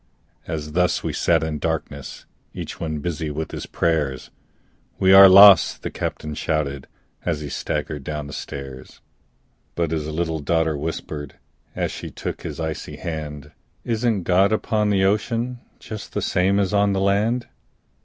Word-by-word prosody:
As 75 -1 -4
thus 90 +2 +1
we - - -2
sat 85 -2 +2
in 80 -1 -3
darkness 70 -2 -4 0.3
Each - - -6
one 80 -2 -3
busy 80 -1 -3
with 75 +1 -4
his - - -6
prayers, 75 -6 -1 0.7
"We 95 0 +4
are 95 0 +11
lost!" 100 -2 +8
the - - -4
captain 75 0 -4
shouted, 70 -3 -2 0.4
As 80 -4 -1
he 75 - -5
staggered 75 +1 -3
down 75 +1 -4
the 75 - -9
stairs. 65 -2 -8 0.8
But 85 -2 -1
his 80 -2 -2
little 80 0 -2
daughter 80 +1 +1
whispered, 75 -1 -5 0.4
As - - -1
she - - -7
took - - -6
his - - -6
icy 80 -1 -4
hand, 75 -3 -6 0.3
"Isn't 115 -4 0
God 95 +3 +3
upon 110 -1 +1
the 100 -2 +2
ocean, 115 +5 0 0.2
Just 110 -1 -9
the - - -1
same 95 +2 +2
as 100 0 0
on 100 -1 +3
the 95 - 0
land?" 105 +5 +1
80 Hz, 155 wpm, -22 LUFS, 75-100 Hz, 0.8 s, are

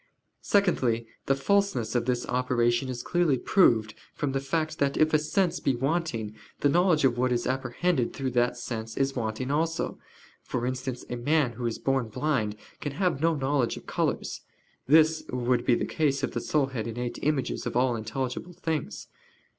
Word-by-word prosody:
Secondly, 130 - +2 0.2
the 135 - +3
falseness 195 - +1
of 120 -2 +1
this 125 -1 0
opinion 125 0 +1
is 125 -1 -4
clearly 175 -6 +2
proved 115 - +3 0.2
from 145 -2 -1
the 135 - 0
fact 155 +3 -2
that 140 -1 +1
if 155 0 +3
a 155 - +5
sense 170 +3 0
be 135 - +1
wanting, 135 -5 -1 0.3
the 145 - +4
knowledge 170 -2 +3
of 120 -2 +2
what 125 0 +2
is 120 -1 0
apprehended 130 +2 0
through 135 -2 -3
that 120 0 +1
sense 115 -2 -5
is 135 0 +1
wanting 120 +2 -2
also: 165 +2 -1 0.4
for 125 -1 -3
instance, 130 0 -3
a - - -1
man 145 +1 +2
who 120 +1 -3
is 115 - -2
born 135 -3 0
blind 110 -5 -1 0.2
can 145 - -4
have 170 -3 0
no 165 0 +3
knowledge 135 -3 0
of - - -11
colors. - - -2 0.5
This 155 +2 +5
would 125 0 +1
not 120 - -11
be 120 - +5
the - - -1
case 140 -4 0
if - - 0
the - - -3
soul 150 -3 +1
had 115 -3 -3
innate 120 +1 -4
images 145 -4 -1
of - - -4
all 125 0 +3
intelligible 125 +9 -4
things. 160 -3 -3
130 Hz, 185 wpm, -27 LUFS, 120-155 Hz, 0.5 s, a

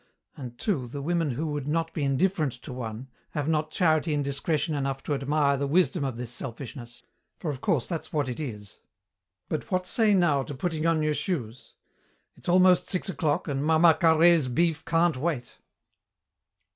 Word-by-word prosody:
And 125 -3 -8
too, 145 - -1
the 140 +4 -6
women 165 0 0
who 140 +5 -2
would 145 -2 -4
not 165 +2 -1
be 150 - -2
indifferent 150 +1 +1
to - - -7
one, 120 0 -6 0.3
have 145 -1 -1
not 155 -1 0
charity 155 -2 +2
and 145 - 0
discretion 150 +3 -1
enough 135 -2 -2
to 150 - -2
admire 140 0 +1
the 140 +1 -1
wisdom 175 +1 +2
of 130 -4 -3
this 120 -1 -5
selfishness, 120 -1 -8 0.3
for 155 - -3
of 135 -2 -7
course 135 -8 +1
that's 165 -3 -5
what 145 -3 0
it 125 +2 -5
is. 105 -9 -7 0.7
But 155 - -4
what 185 -1 0
say, 215 0 +3
now, 165 -7 +3
to 140 - -6
putting 160 +2 -1
on 160 -2 +2
your 155 0 +1
shoes? 130 - -4 0.6
It's - - -8
almost 185 0 +5
six 185 0 -2
o'clock 150 -3 -1
and 140 -1 -1
Mama 160 +2 +5
Carhaix's 160 -1 +4
beef 160 +5 +1
can't 165 -3 +2
wait." 140 -3 -3
150 Hz, 180 wpm, -27 LUFS, 135-165 Hz, 0.7 s, almost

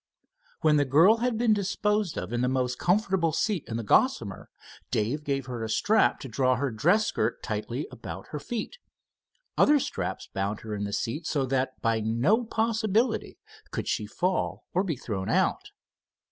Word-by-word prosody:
When 155 -3 +4
the 145 - +4
girl 165 - +5
had 240 -1 0
been 230 -1 +3
disposed 210 -2 0
of 90 +6 -4
in 120 - 0
the 125 - +2
most 125 -1 -1
comfortable 185 -3 +2
seat 195 +1 -1
in 115 - -3
the 115 - -3
Gossamer, 110 - +1 0.4
Dave 120 +8 -1
gave 135 -2 -1
her 120 -3 -5
a 110 - -4
strap 215 - +3
to - - -6
draw 130 +2 +2
her 135 +1 -1
dress 175 - +3
skirt - - -1
tightly - - -3
about - - -8
her - - -4
feet. 240 - -5 0.8
Other 295 0 +6
straps 285 +2 -3
bound 100 +2 -2
her 110 -1 -6
in 105 0 -2
the 100 - -4
seat 150 +11 -2
so 140 -3 0
that 130 0 -1
by 115 -1 +2
no 120 - +2
possibility 220 +1 0 0.3
could - - -4
she 105 - -1
fall 180 - -1
or 185 - +2
be 170 -6 -2
thrown 100 -6 -4
out. - - +1
145 Hz, 175 wpm, -27 LUFS, -, 0.8 s, Other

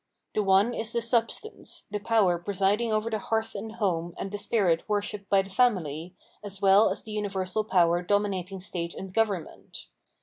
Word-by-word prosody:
The 215 - +1
one 195 +4 +4
is 225 -1 -2
the 235 - +1
substance, 235 - -2
the 210 - -2
power 205 -5 +2
presiding 200 +5 +1
over 215 +1 0
the 215 - -1
hearth 220 +2 -1
and 220 +2 -6
home 175 -6 -1
and 195 - -5
the 205 - -4
spirit 185 -7 +2
worshipped 205 -1 -2
by 195 -1 +4
the 195 - -12
family, 180 - 0 0.3
as 200 -2 -8
well 195 +2 +6
as - - -4
the 215 -1 -5
umversal 200 0 -2
power 175 -1 +4
dominating 195 -1 -1
state 170 -3 -5
and 190 -1 -8
government. 205 -6 -2
200 Hz, 175 wpm, -27 LUFS, 185-220 Hz, 0.3 s, well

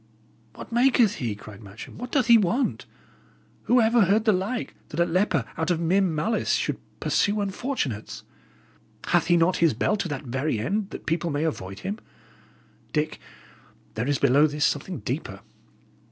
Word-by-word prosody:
"What - - -10
maketh 240 -3 +3
he?" 115 -5 -2
cried 105 0 -12
Matcham. 100 - -11
"What 250 +1 -6
doth 275 -5 +2
he 235 0 +7
want? 230 +5 +1 0.8
Who 250 - +4
ever 225 -1 +4
heard 210 +4 +2
the 220 - +5
like, 200 +7 -2 0.2
that 150 - -5
a 170 - +4
leper, 175 - +1
out 160 +2 -1
of 175 -2 +1
mere 175 +4 +2
malice, 185 +5 0
should - - -1 0.2
pursue 205 0 +1
unfortunates? 195 - -3 0.8
Hath - - +2
he 175 0 +4
not 170 +2 +3
his 165 -8 +3
bell 210 - +1
to 195 - -2
that 145 -2 -4
very 130 +1 -1
end, 195 - -1
that - - -9
people 170 +1 -1
may 145 0 -1
avoid 95 -11 -4
him? 200 +3 -4 0.9
Dick, 155 0 -1 0.7
there 115 +4 -2
is 145 -1 +1
below 140 +3 +4
this 150 0 0
something 150 +2 -2
deeper." 120 -7 -4
170 Hz, 170 wpm, -25 LUFS, 145-210 Hz, 0.9 s, he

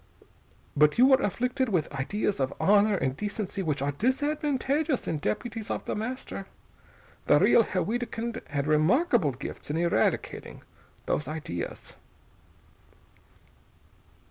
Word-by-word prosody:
But 150 +4 +4
you 250 - +7
were 265 0 +5
afflicted 250 +5 0
with 170 -7 -1
ideas 190 +7 -1
of 135 0 -1
honor 205 +1 +4
and 130 -5 -1
decency, 205 +1 -3
which 150 -6 -1
are 145 - 0
disadvantageous 285 - 0
in 155 - -1
deputies 220 - -3
of - - -3
The - - -2
Master. 220 -3 -5 0.8
The - - +6
real - - +6
Herr 185 -5 -1
Wiedkind 230 +2 -3
had 145 -2 -2
remarkable 165 - +3
gifts 130 - -7
in 150 - -1
eradicating 170 -10 -1 0.4
those 150 - -1
ideas." 150 - -6
205 Hz, 120 wpm, -27 LUFS, 150-245 Hz, 0.8 s, you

